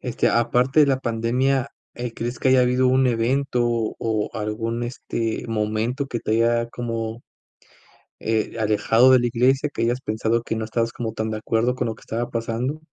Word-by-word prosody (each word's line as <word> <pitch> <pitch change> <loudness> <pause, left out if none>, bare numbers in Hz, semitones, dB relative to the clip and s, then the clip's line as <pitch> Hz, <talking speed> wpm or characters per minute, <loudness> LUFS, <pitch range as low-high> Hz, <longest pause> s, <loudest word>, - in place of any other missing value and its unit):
Este, 125 -2 0
aparte 125 +5 +2
de 150 - +6
la 135 -2 +2
pandemia, 125 +3 0 0.3
eh, 120 -1 -5
¿crees 120 +2 -4
que 130 - +2
haya 130 -1 +5
habido 125 +1 +3
un 130 0 +3
evento 125 +2 +1 0.4
o 110 -2 -1
algún, 115 +2 -3
este, 115 -1 -3
momento 115 +5 -1
que 120 - -3
te 110 - -2
haya, 115 +1 +2
como, 115 -1 -4 1.0
eh, 110 +1 -1
alejado 110 +3 +4
de 130 -1 +6
la 120 - +1
iglesia, 130 +4 +2
que - - -3
hayas 120 +2 +1
pensado 110 +1 0
que 115 - -3
no 110 - -2
estabas 115 +1 -1
como 115 -3 -4
tan 110 0 -2
de 110 - -3
acuerdo 115 +3 0
con 125 -1 -2
lo 115 - -2
que - - -19
estaba 120 +2 -3
pasando? 115 +6 -2
115 Hz, 185 wpm, -23 LUFS, 115-125 Hz, 1.0 s, de